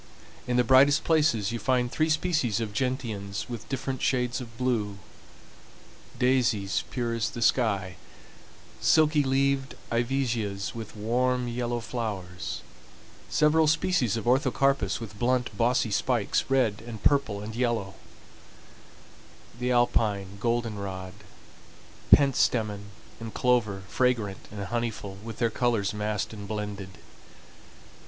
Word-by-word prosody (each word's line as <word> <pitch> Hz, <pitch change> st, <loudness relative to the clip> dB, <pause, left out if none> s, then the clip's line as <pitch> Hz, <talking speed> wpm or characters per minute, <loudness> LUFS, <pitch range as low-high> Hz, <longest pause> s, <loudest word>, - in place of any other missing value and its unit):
In 125 Hz, 0 st, +1 dB
the 125 Hz, -, +5 dB
brightest 135 Hz, +5 st, +5 dB
places 150 Hz, -11 st, +2 dB
you 115 Hz, -, -3 dB
find 125 Hz, -1 st, +1 dB
three 155 Hz, +3 st, +1 dB
species 155 Hz, -, +1 dB
of 110 Hz, -3 st, -3 dB
gentians 110 Hz, -6 st, -3 dB
with 120 Hz, -3 st, -7 dB
different 135 Hz, -1 st, -3 dB
shades 125 Hz, -1 st, 0 dB
of 115 Hz, -2 st, -10 dB
blue, 115 Hz, -6 st, -1 dB, 1.2 s
daisies 120 Hz, -7 st, +1 dB
pure 120 Hz, -2 st, -2 dB
as 115 Hz, -1 st, -1 dB
the -, -, -7 dB
sky, 100 Hz, -9 st, +1 dB, 0.8 s
silky 155 Hz, -1 st, +4 dB
leaved 135 Hz, 0 st, +1 dB, 0.2 s
ivesias 115 Hz, -5 st, -1 dB
with 115 Hz, -2 st, -8 dB
warm 125 Hz, +3 st, 0 dB
yellow 120 Hz, 0 st, -2 dB
flowers, 100 Hz, -7 st, -5 dB, 0.7 s
several 155 Hz, +1 st, +4 dB
species 155 Hz, -, +2 dB
of 115 Hz, -, -4 dB
orthocarpus 135 Hz, +2 st, +2 dB
with 100 Hz, -3 st, -9 dB
blunt, 125 Hz, -3 st, 0 dB
bossy 115 Hz, 0 st, +1 dB
spikes, 115 Hz, 0 st, +1 dB
red 125 Hz, -7 st, +2 dB
and 110 Hz, -3 st, -8 dB
purple 125 Hz, -8 st, +2 dB
and 110 Hz, +1 st, -7 dB
yellow; 115 Hz, -6 st, -1 dB, 1.7 s
the 125 Hz, 0 st, 0 dB
alpine 105 Hz, -5 st, +1 dB
goldenrod, 100 Hz, -5 st, -2 dB, 1.0 s
pentstemon, 110 Hz, -7 st, +3 dB, 0.3 s
and 115 Hz, -1 st, -8 dB
clover, 110 Hz, -6 st, +1 dB
fragrant 115 Hz, -6 st, 0 dB
and 100 Hz, -1 st, -5 dB
honeyful, 115 Hz, -5 st, -3 dB
with 115 Hz, -1 st, -7 dB
their 115 Hz, -2 st, +1 dB
colors 110 Hz, -4 st, 0 dB
massed 105 Hz, 0 st, -2 dB
and 100 Hz, -2 st, -8 dB
blended. 105 Hz, -2 st, -5 dB
120 Hz, 120 wpm, -27 LUFS, 105-130 Hz, 1.7 s, the